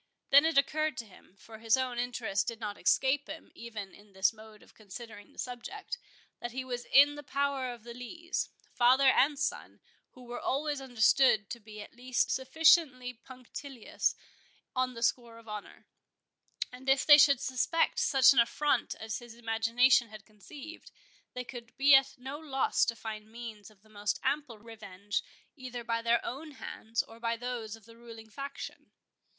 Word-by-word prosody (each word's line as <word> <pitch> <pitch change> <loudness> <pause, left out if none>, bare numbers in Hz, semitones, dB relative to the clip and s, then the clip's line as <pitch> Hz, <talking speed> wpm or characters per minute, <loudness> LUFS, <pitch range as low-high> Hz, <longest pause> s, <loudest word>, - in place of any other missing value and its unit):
Then 280 +3 +8
it 320 -2 +1
occurred 310 0 +2
to 230 - -5
him—for 205 +2 -16
his 225 +2 +3
own 255 -2 -2
interest 235 -5 -1
did 230 -1 -4
not 210 -3 -4
escape 275 +5 +2
him, 320 - -9
even 215 -4 -8
in 205 -1 -18
this 190 +4 +2
mode 215 -1 -15
of - - -21
considering 210 0 -11
the - - -25
subject—that 315 - -8
he 260 +2 -4
was 245 -1 -5
in 285 +1 +6
the 295 - -8
power 280 -2 -1
of 235 -3 -11
the 235 0 -9
Lees, 320 +9 -4 0.2
father 255 +2 +5
and 285 +2 +3
son, 285 - -3 0.3
who 255 - -14
were 245 0 -6
always 290 +1 -1
understood 245 -3 +3
to 235 - -5
be 210 -1 -10
at - - -15
least 250 +1 0
sufficiently 265 -2 +3
punctilious 255 +1 -4 0.6
on 255 -1 0
the 230 - -5
score 235 -1 0
of 230 0 -16
honour; 210 -1 -8 0.9
and 255 +2 -6
if 270 0 +3
they 295 -1 +9
should 280 -2 +6
suspect 275 - 0
such 270 - +6
an 260 - +4
affront 255 +2 +1
as 220 -1 -5
his 240 -2 -12
imagination 230 +1 +3
had 215 -1 -12
conceived, 280 - -12 0.5
they 250 - -3
could 240 -2 -11
be 275 +2 +6
at 270 0 +5
no 265 +3 -7
loss 275 -4 +1
to 230 - -2
find 215 -1 -7
means 225 -3 -9
of 210 -2 -24
the - - -22
most 210 -1 -3
ample 285 -6 -1
revenge, 205 -3 -5 0.3
either 250 -4 -7
by 230 0 -1
their 235 0 +3
own 295 +4 -6
hands, 225 -3 -4
or 225 0 -15
by 230 0 -1
those 235 -3 -5
of 225 -2 -19
the 230 0 -15
ruling 225 -2 -12
faction. 275 +3 -8
245 Hz, 175 wpm, -31 LUFS, 225-270 Hz, 0.9 s, they